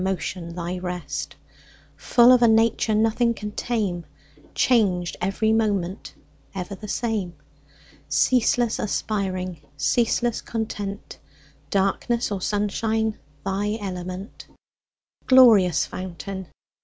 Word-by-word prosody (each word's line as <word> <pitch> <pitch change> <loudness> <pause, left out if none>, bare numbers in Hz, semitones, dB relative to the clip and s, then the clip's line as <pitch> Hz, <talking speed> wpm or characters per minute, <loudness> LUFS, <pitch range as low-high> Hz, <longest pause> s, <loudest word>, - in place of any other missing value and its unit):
Motion 180 -2 -3
thy 180 +1 -4
rest; 180 -1 -5 0.6
Full 240 0 +5
of 250 -1 +6
a 235 - +6
nature 225 -1 +3
Nothing 230 +2 +2
can 210 -1 -6
tame, 205 -7 -2 0.5
Changed 190 -8 +2
every 205 +4 +1
moment, 205 -4 -1 0.4
Ever 185 +1 -4
the 210 +2 -8
same; 210 -6 -2 0.7
Ceaseless 240 -2 +2
aspiring, 185 -5 -2 0.2
Ceaseless 235 +5 +1
content, 210 -3 -5 0.5
Darkness 205 +4 0
or 195 -2 -2
sunshine 215 +2 -1 0.3
Thy 205 +2 -1
element; 185 0 -6 0.8
Glorious 220 - +6
fountain. 190 +1 -7
205 Hz, 95 wpm, -24 LUFS, 185-225 Hz, 0.8 s, of